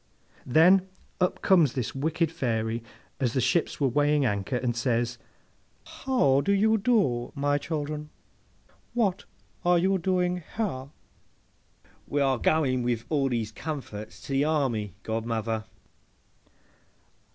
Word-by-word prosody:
Then, 180 +8 +5 0.3
up 180 -1 0
comes 170 - +4
this 125 -4 -3
wicked 160 +4 0
Fairy 115 -5 -1 0.4
as 125 -4 0
the 130 - +1
ships 130 +7 +1
were 140 - +3
weighing 145 +2 +2
anchor, 105 +2 -1
and 120 -1 -1
says, 120 -1 0 0.7
'How 140 - +1
do 200 - +1
you 220 +2 +3
do, 145 - +1
my 145 0 +1
children? 150 0 -4 0.9
What 205 -5 0 0.4
are 175 -1 +4
you 190 +2 +2
doing 180 0 0 0.2
here?'—'We 145 - -7
are 135 -3 +2
going 130 -4 +2
with 120 -2 -1
all 140 -3 +1
these 115 -3 -2
comforts 110 -6 -6
to - - -9
the 135 +1 +3
army, 130 - 0
godmother. 110 -1 -2
140 Hz, 120 wpm, -27 LUFS, 120-170 Hz, 0.9 s, Then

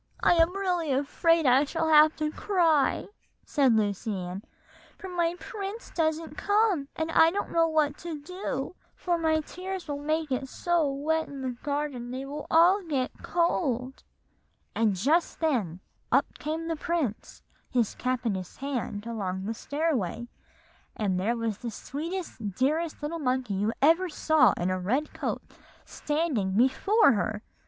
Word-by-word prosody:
'I - - +6
am 335 +3 +3
really 355 -6 0
afraid 310 +4 +2
I 260 +2 +5
shall 320 +2 -1
have 310 0 +6
to 305 -1 -2
cry,' 330 -7 +2 0.4
said 270 -6 +3
Lucy 210 +1 0
Ann; 180 +1 -5 0.6
'for 380 - -8
my 345 -1 0
prince 415 +2 -6
doesn't 320 -1 -1
come, 410 -8 +2
and 320 0 -2
I 325 0 +6
don't 400 +4 -3
know 330 -1 +3
what 305 -2 +1
to 335 -3 -5
do, 310 -2 -4 0.2
for 350 -2 -1
my 315 -1 +2
tears 370 +3 -6
will 290 -1 -3
make 310 0 -1
it 265 +1 -2
so 340 -3 +1
wet 315 +3 0
in 280 -1 -8
the 260 - -1
garden 280 -1 -3
that 255 - -4
they 270 - -5
will 290 +2 -6
all 350 +5 +5
get 280 -8 -1
cold;' 265 -7 0 0.7
and 220 -3 +2
just 295 - +1
then 220 - 0 0.3
up - - +4
came 320 +2 -3
the 330 - -1
prince, 310 - -3 0.3
his 240 -5 +1
cap 255 -1 -2
in 225 - +1
his 185 -2 -6
hand, 250 -6 -4
along 190 -5 -3
the 225 - -2
stairway, 260 - -2 0.7
and 190 -4 0
there 230 +6 0
was 225 -3 -2
the 240 - -4
sweetest, 285 - -5
dearest 305 +5 0
little 330 +3 -3
monkey 255 -5 -1
you 205 +3 0
ever 335 +5 +4
saw 300 -6 +4
in 180 +1 -1
a 185 - -1
red 255 +12 -1
coat, - - -3 0.4
standing 295 - -1
before 280 - +4
her!" 215 -1 -1
295 Hz, 160 wpm, -28 LUFS, 240-330 Hz, 0.7 s, I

